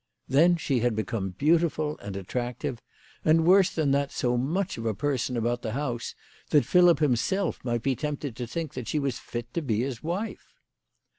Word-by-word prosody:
Then 165 Hz, +7 st, +5 dB
she 135 Hz, -5 st, 0 dB
had 120 Hz, -1 st, +1 dB
become 105 Hz, -4 st, -3 dB
beautiful 155 Hz, -1 st, +2 dB
and 100 Hz, -1 st, -7 dB
attractive, 120 Hz, +4 st, -4 dB, 0.4 s
and 160 Hz, +1 st, +4 dB
worse 190 Hz, +1 st, +6 dB
than 155 Hz, -4 st, 0 dB
that, 140 Hz, 0 st, +1 dB
so 125 Hz, -1 st, 0 dB
much 165 Hz, +7 st, -1 dB
of 115 Hz, -, -5 dB
a 110 Hz, -, 0 dB
person 130 Hz, -1 st, -1 dB
about 120 Hz, +1 st, 0 dB
the 110 Hz, -, -4 dB
house 125 Hz, -4 st, -3 dB, 0.3 s
that 150 Hz, -, +4 dB
Philip 175 Hz, -1 st, +5 dB
himself 155 Hz, -, 0 dB
might 120 Hz, -2 st, -1 dB
be 135 Hz, -1 st, +1 dB
tempted 145 Hz, -3 st, -4 dB
to 120 Hz, -1 st, -4 dB
think 160 Hz, +4 st, -4 dB
that 125 Hz, -, -6 dB
she -, -, -1 dB
was 140 Hz, -4 st, -1 dB
fit 120 Hz, 0 st, -7 dB
to 170 Hz, -, -1 dB
be 115 Hz, -7 st, 0 dB
his 125 Hz, -2 st, -3 dB
wife 180 Hz, +7 st, -4 dB
135 Hz, 190 wpm, -27 LUFS, 120-160 Hz, 0.4 s, worse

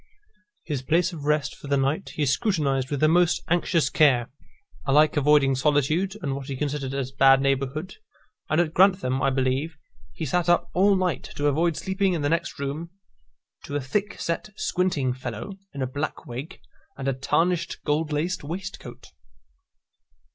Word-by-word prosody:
His 145 Hz, -5 st, -3 dB
place 170 Hz, +7 st, +1 dB
of 150 Hz, -4 st, -7 dB
rest 150 Hz, -2 st, +1 dB
for -, -, -11 dB
the 140 Hz, 0 st, +2 dB
night 135 Hz, +7 st, -1 dB
he 150 Hz, -, 0 dB
scrutinised 140 Hz, -, 0 dB
with 145 Hz, -2 st, -2 dB
the 155 Hz, -, +5 dB
most 175 Hz, +1 st, +3 dB
anxious 170 Hz, -3 st, +2 dB
care, 130 Hz, -7 st, +3 dB, 0.5 s
alike 150 Hz, +2 st, +4 dB
avoiding 145 Hz, -2 st, +4 dB
solitude, 150 Hz, +8 st, +1 dB
and 140 Hz, -, -1 dB
what 135 Hz, -1 st, -7 dB
he 135 Hz, -, -4 dB
considered 140 Hz, -1 st, -3 dB
as 135 Hz, -1 st, -3 dB
bad 135 Hz, 0 st, +5 dB
neighbourhood; 135 Hz, +5 st, -1 dB, 0.5 s
and 155 Hz, -, +2 dB
at 165 Hz, -2 st, +1 dB
Grantham, 185 Hz, -9 st, +3 dB
I -, -, +3 dB
believe, 135 Hz, +4 st, -1 dB, 0.3 s
he 160 Hz, -, -5 dB
sate 175 Hz, +4 st, 0 dB
up 175 Hz, -, +2 dB
all 195 Hz, +2 st, +4 dB
night 180 Hz, -6 st, -1 dB
to 145 Hz, -, -2 dB
avoid 160 Hz, +3 st, +2 dB
sleeping 190 Hz, 0 st, 0 dB
in 160 Hz, -4 st, -2 dB
the 145 Hz, -, +1 dB
next 165 Hz, +2 st, -1 dB
room 145 Hz, +4 st, -4 dB, 0.8 s
to 145 Hz, -, -5 dB
a -, -, +1 dB
thick 200 Hz, +10 st, -2 dB
set 170 Hz, +5 st, -3 dB
squinting 175 Hz, -11 st, 0 dB
fellow, 125 Hz, -, -6 dB, 0.2 s
in 140 Hz, -2 st, -4 dB
a -, -, +1 dB
black 145 Hz, +4 st, -4 dB
wig, 135 Hz, +10 st, -7 dB, 0.4 s
and 135 Hz, -, -4 dB
a 135 Hz, -, +2 dB
tarnished 165 Hz, +6 st, 0 dB
gold 150 Hz, +1 st, 0 dB
laced 155 Hz, +4 st, -1 dB
waistcoat. 185 Hz, +7 st, -7 dB
150 Hz, 170 wpm, -25 LUFS, 135-170 Hz, 0.8 s, the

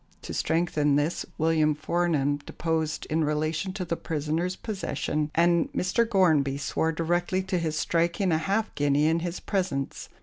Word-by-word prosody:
To -, -, -6 dB
strengthen 155 Hz, -3 st, +1 dB
this, 145 Hz, +4 st, 0 dB
William 155 Hz, -1 st, +2 dB
Fornham 155 Hz, -2 st, 0 dB
deposed 160 Hz, -2 st, -2 dB
in 160 Hz, +1 st, +2 dB
relation 155 Hz, +4 st, -1 dB
to 190 Hz, -2 st, -4 dB
the 170 Hz, -, -1 dB
prisoners' 160 Hz, +4 st, -2 dB
possession, 155 Hz, -, -2 dB
and 170 Hz, 0 st, +3 dB
Mr. 225 Hz, +5 st, +1 dB
Gornbey 155 Hz, -9 st, +3 dB
swore 160 Hz, +2 st, 0 dB
directly 175 Hz, +3 st, 0 dB
to 185 Hz, -1 st, -1 dB
his 160 Hz, -2 st, -2 dB
striking 170 Hz, +4 st, +1 dB
a 160 Hz, -, +2 dB
half 200 Hz, +7 st, -1 dB
guinea 145 Hz, +1 st, +2 dB
in 165 Hz, +2 st, +3 dB
his 175 Hz, +1 st, -4 dB
presence. 180 Hz, -9 st, -2 dB
165 Hz, 155 wpm, -27 LUFS, 150-175 Hz, -, and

